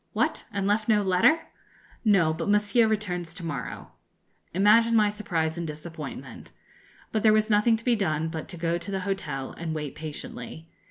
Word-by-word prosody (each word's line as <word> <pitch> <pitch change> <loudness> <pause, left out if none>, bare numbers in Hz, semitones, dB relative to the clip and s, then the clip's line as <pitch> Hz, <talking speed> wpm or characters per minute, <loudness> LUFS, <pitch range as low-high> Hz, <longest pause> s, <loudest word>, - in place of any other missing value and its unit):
'What! - - 0
and 200 -1 -2
left 210 +2 +1
no 210 -2 +4
letter?' 195 - +4 0.6
'No; 190 -8 +4
but 165 +4 -3
Monsieur 210 +3 +3
returns 180 -6 -2
to 175 - -7
morrow.' 140 -6 -5 0.6
Imagine 220 +5 +5
my 210 -2 +4
surprise 170 -6 -2
and 170 - -3
disappointment! 150 -5 -8 0.6
But 220 - 0
there 215 0 +5
was 215 +1 +2
nothing 210 +2 +4
to 225 - -15
be 245 -2 +4
done 160 -6 0
but 160 -1 -6
to 175 - -7
go 170 +1 0
to 170 - -8
the 195 -1 -2
hotel 180 -9 -3
and 160 -1 -5
wait 150 -3 -4
patiently. 155 -1 -8
185 Hz, 175 wpm, -26 LUFS, 160-210 Hz, 0.6 s, Imagine